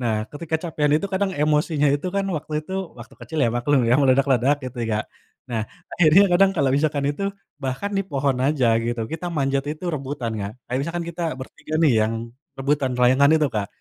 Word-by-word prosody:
nah 120 -3 0 0.2
ketika 160 +1 -2
kecapekan 155 -3 -1
itu 160 - -3
kadang 190 +1 +1
emosinya 150 0 +2
itu 145 +5 -3
kan 200 - +1
waktu 155 +1 -7
itu 190 - -9 0.3
waktu 120 - -12
kecil 120 +7 -6
ya 115 - +3
maklum 135 +3 +2
ya - - +5
meledak-ledak 135 0 +3
gitu 125 0 -7
ya 115 - -1
Kak, 105 0 0 0.4
nah 115 -3 -1 0.3
akhirnya 170 +3 +6
kadang 190 +2 +5
kalau 140 -4 +2
misalkan 145 -1 0
itu, 170 - -7 0.4
bahkan 135 +9 -3
di - - +3
pohon 135 -2 0
aja 140 -4 +2 0.2
gitu 120 0 -2
kita 165 +2 -4
manjat 135 -1 0
itu 155 +4 -10
rebutan 135 -5 -4
Kak 100 +1 -4
kayak 125 - -2
misalkan 170 +4 -3
kita 170 +1 -6
bertiga 150 +4 -8
nih 145 - +5
yang, 110 +1 +1 0.4
rebutan 135 0 0
layangan 130 +3 +5
itu 155 - +2
Kak, 105 -2 -1
145 Hz, 195 wpm, -23 LUFS, 130-155 Hz, 0.4 s, akhirnya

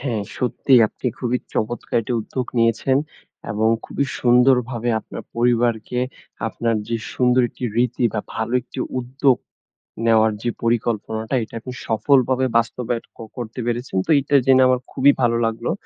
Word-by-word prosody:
হ্যাঁ, 120 -6 -2 0.2
সত্যি 130 +1 -1
আপনি 125 - -7
খুবি 125 0 0 0.2
চমৎকার 120 +2 -2
একটি 115 +2 -4
উদ্যোগ 125 +3 -4
নিয়েছেন, 115 +3 +2 0.5
এবং 110 +2 +1 0.2
খুবই 140 - -2 0.2
সুন্দরভাবে 125 -1 +3
আপনার - - -9
পরিবারকে 120 0 +1 0.5
আপনার 115 0 -1
যে, 115 - 0 0.2
সুন্দর 125 0 +3
একটি 125 - -8
রীতি, 120 0 +1
বা - - 0
ভালো 110 +2 -3
একটি 130 - -12 0.2
উদ্যোগ 130 +1 +2 0.7
নেওয়ার 110 -1 +4
যে, 120 - -1
পরিকল্পনাটা 115 0 -1
এটা 110 - -12
আপনি 125 +2 -8
সফলভাবে 130 +2 +2
বাস্তবায়ন 115 0 -1
ক - - -30 0.2
করতে 120 +1 -6
পেরেছেন। 120 -3 -2
তো - - -18
এটা 140 +1 0
জেনে 130 -1 +6
আমার 130 -1 +2
খুবই 140 +2 +5
ভালো 115 -1 +3
লাগলো। 115 0 -2
120 Hz, 150 wpm, -21 LUFS, 115-130 Hz, 0.7 s, জেনে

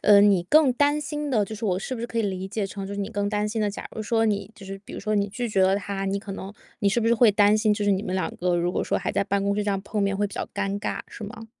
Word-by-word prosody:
呃， 205 -1 +7
你 200 -3 +5
更 295 - +5
担 290 +3 +2
心 295 0 -3
的 220 -5 +3
就 220 - -7
是 220 +2 -6
我 185 -3 +1
是 255 +6 -4
不 235 - -6
是 235 - -2
可 230 - -3
以 - - +2
理 190 -2 -3
解 205 0 -2
成 195 0 -6
就 200 - -5
是 200 - -3
你 200 - -2
更 205 -2 -1
担 210 0 0
心 220 +1 -2
的 210 -1 +1
假 200 - -7
如 220 - -4
说 225 +1 +1
你 205 -2 0
就 195 - -12
是 195 0 -7
比 - - -11
如 - - -5
说 215 +1 -1
你 200 -1 +1
拒 240 +4 -3
绝 195 -3 +2
了 190 +1 +4
他， 200 -1 -3
你 195 +1 0
可 200 -1 -7
能 195 0 -7 0.3
你 200 - +2
是 220 +4 +1
不 230 - 0
是 235 - +5
会 235 -1 +6
担 205 +1 +4
心 215 -1 +3
就 210 0 -1
是 205 - +3
你 195 0 0
们 185 - -3
两 190 - -2
个 180 0 +1
如 175 +1 0
果 - - 0
说 - - 0
还 - - -3
在 - - +2
办 200 0 0
公 200 0 +1
室 210 - 0
这 205 - 0
样 195 -1 -1
碰 205 +1 -2
面 200 0 +1
会 205 +1 +1
比 200 - -10
较 - - -4
尴 200 0 -1
尬， - - -2
是 - - -10
吗？ 225 +2 -8
205 Hz, 380 characters per minute, -25 LUFS, 195-220 Hz, 0.3 s, 呃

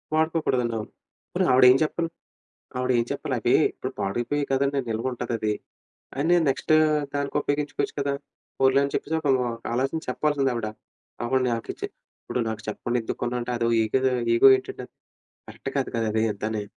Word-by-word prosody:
వాడుకోకూడదండి 155 -7 +1
అవును. 105 - -6 0.4
పోని - - +2
ఆవిడ 125 0 +6
ఏం 130 - +5
చెప్పాలి? 165 +2 -1 0.7
ఆవిడ 125 0 0
ఏం 115 - +1
చెప్పాలి? - - -3
అవీ - - +2 0.2
ఇప్పుడు - - -5
పాడైపోయాయి 120 +8 -1
కదండి! 140 +1 +1
నిలువుంటదది 115 -2 -1 0.7
అని 165 +5 +4
నెక్స్ట్ 145 - +1 0.4
దానికి 140 0 -2
ఉపయోగించుకోవచ్చు 145 0 -1
కదా? 140 0 0 0.5
పోన్లే 135 +1 +5
అని 140 - -6
చెప్పేసి 160 - -1
ఒక్కళ్ళు 135 -4 +2 0.3
ఆలోచించి 135 +6 -1
చెప్పాల్సింది 145 -3 +1
ఆవిడ. 115 -2 -2 0.6
ఆవిడనకిచ్చి 125 -2 -1 0.4
ఇప్పుడు - - -3
నాకు 110 - -4
చెప్పకుండా 120 +3 -1
ఎందుకు - - -4
కొన్నావంటే? 120 0 -2
అదో 115 0 +1
ఇగో, 110 +4 +1 0.3
ఇగో 135 +3 +8
ఏంటండది? - - -8 0.6
కరెక్ట్ - - -7
కాదు - - 0
కదాది 110 -1 +1
అంతాని. 105 +1 -3
130 Hz, 145 wpm, -25 LUFS, 115-140 Hz, 0.7 s, ఇగో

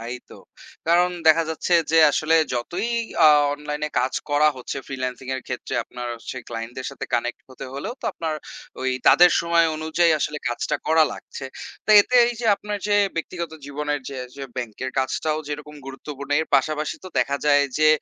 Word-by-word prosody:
তাই 120 +2 -5 0.2
তো। - - -11 0.5
কারণ 175 +1 +4 0.2
দেখা 165 +1 +6
যাচ্ছে 160 +2 -3 0.2
যে 165 - +5
আসলে 155 +1 +2 0.2
যতই 175 - -2 0.4
আ - - +10 0.3
অনলাইন 150 0 -6
এ - - -27
কাজ 130 +1 -1 0.2
করা 150 +1 +4
হচ্ছে 125 - -6
ফ্রিল্যান্সিং 130 -1 -5
এর 130 - -4
ক্ষেত্রে 125 - -5
আপনার 125 -1 -7
হচ্ছে 115 +2 -8
ক্লায়েন্টদের 120 +3 -6
সাথে 140 - -7
কানেক্ট 120 0 -1
হতে 130 - -9
হলেও 140 - -5
তো - - -11
আপনার 160 -2 -3 0.5
ওই 130 - +1 0.2
তাদের 175 0 +7
সময় 170 0 +3
অনুযায়ী 160 +2 +2
আসলে 150 +1 -2
কাজটা 135 +5 -2
করা 160 0 +5
লাগছে। 135 - -9 0.4
তো - - -1
এতে 250 - -2
এই 240 - 0
যে 235 - -2
আপনার 210 0 -5
যে 205 - +4 0.2
ব্যক্তিগত 170 0 -4
জীবনের 145 +1 -3
যে 135 -2 -6 0.2
যে 140 - -5
ব্যাংক 115 -4 -5
এর 130 - -2
কাজটাও 155 +4 0
যেরকম 150 0 -6
গুরুত্বপূর্ণ 140 +1 -8
এর 160 - -3
পাশাপাশি 150 +3 -1
তো - - -6
দেখা 140 +2 +1
যায় 145 -1 +5
যে 155 0 +5
150 Hz, 185 wpm, -23 LUFS, 130-160 Hz, 0.5 s, আ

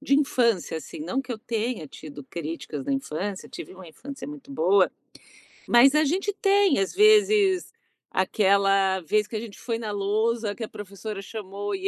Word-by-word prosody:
de 285 -1 +2
infância, 235 - +1
assim. 230 - -8
Não 270 -3 -2
que 255 - -6
eu 225 - -6
tenha 230 -5 -3
tido 145 0 -10
críticas 155 -2 -6
na 140 - -1
infância, 155 +9 -3
tive - - -9
uma 185 -2 -12
infância 275 - -9
muito 290 -1 -10
boa, 190 -4 +3 0.8
mas 245 +3 +6
a 305 +1 +4
gente 380 +7 0
tem, 395 - +3
às 195 - -1
vezes, 415 -2 +4 0.4
aquela 195 0 +2
vez 210 +5 +1
que 220 - -8
a - - -1
gente 220 -2 -9
foi 230 -2 -2
na 220 -2 -4
lousa, 210 +2 0
que 235 - -6
a - - -4
professora 200 +1 -7
chamou 200 -1 -5
e 190 0 -3
215 Hz, 175 wpm, -25 LUFS, 190-275 Hz, 0.8 s, mas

